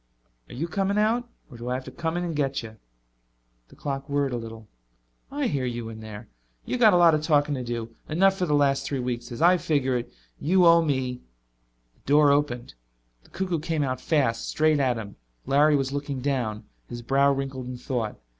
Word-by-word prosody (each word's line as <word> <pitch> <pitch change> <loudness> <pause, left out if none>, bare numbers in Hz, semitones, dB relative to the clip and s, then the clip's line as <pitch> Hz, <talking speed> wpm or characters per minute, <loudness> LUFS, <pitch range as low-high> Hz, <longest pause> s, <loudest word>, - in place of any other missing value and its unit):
"Are - - -9
you 160 +7 -2
coming 195 +4 -1
out? 230 +3 +1 0.2
Or 120 - -10
do 120 +1 -5
I 125 - 0
have 130 - -4
to 130 - -8
come 165 +5 -3
in 175 - -1
and 170 -2 -3
get 135 -3 -1
you?" 110 -1 -10 0.9
The - - -18
clock 140 0 -5
whirred 140 -2 0
a - - -1
little. 115 -2 -9 0.6
"I 285 0 -2
hear 140 - -1
you 120 -2 -4
in 110 -1 -9
there. 110 0 -9 0.4
You've 250 - -2
got 220 -4 +6
a - - +5
lot 170 -2 +6
of 155 - +1
talking 150 -2 +2
to 130 -3 -3
do, 115 -1 -5
enough 190 +5 +3
for 180 -2 -1
the 150 - +2
last 140 -1 +2
three 140 0 -3
weeks. 120 -1 -4
As 120 - -3
I 180 +1 +6
figure 140 -6 0
it, 120 0 -3 0.3
you 180 +4 +3
owe 170 0 +7
me 130 -5 -1 0.4
" - - -44
The - - -33
door 145 +1 +5
opened. 140 -4 0 0.5
The - - -21
cuckoo 185 -3 -2
came 155 -1 -1
out 130 -2 -2
fast, 130 -8 0
straight 155 -1 +2
at 130 -3 +1
him. 105 -3 -8 0.3
Larry 150 +2 +4
was 135 -1 0
looking 140 -1 -3
down, 125 -5 -2 0.3
his 120 0 -7
brow 140 +3 +3
wrinkled 135 -2 -3
in 125 0 -6
thought. 120 -3 -3
140 Hz, 215 wpm, -25 LUFS, 120-155 Hz, 0.9 s, owe